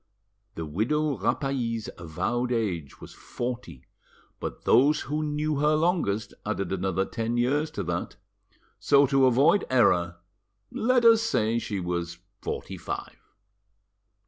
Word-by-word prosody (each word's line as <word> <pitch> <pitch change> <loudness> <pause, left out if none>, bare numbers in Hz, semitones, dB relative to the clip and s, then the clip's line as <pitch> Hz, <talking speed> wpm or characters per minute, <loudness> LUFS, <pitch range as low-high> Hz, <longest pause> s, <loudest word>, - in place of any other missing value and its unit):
The 80 - -4
widow 135 - 0
Rapally's 115 0 -1
avowed 95 +10 -2
age 95 - -2
was - - -11
forty, 120 - -6 0.5
but - - -6
those 145 +6 +4
who 150 +4 -2
knew 150 0 -1
her 150 +2 +3
longest 155 - 0
added 100 -4 -3
another 95 0 0
ten 115 +3 -3
years 145 +6 +1
to - - -4
that: - - -3 0.6
so, 140 0 +5
to 135 -1 +4
avoid 140 +11 +4
error, 90 -8 +3 0.5
let 245 +1 +2
us 225 -1 +7
say 115 - +1
she 105 -4 -4
was 85 -1 -3 0.2
forty - - -5
five. - - -6
120 Hz, 125 wpm, -26 LUFS, 95-150 Hz, 0.6 s, us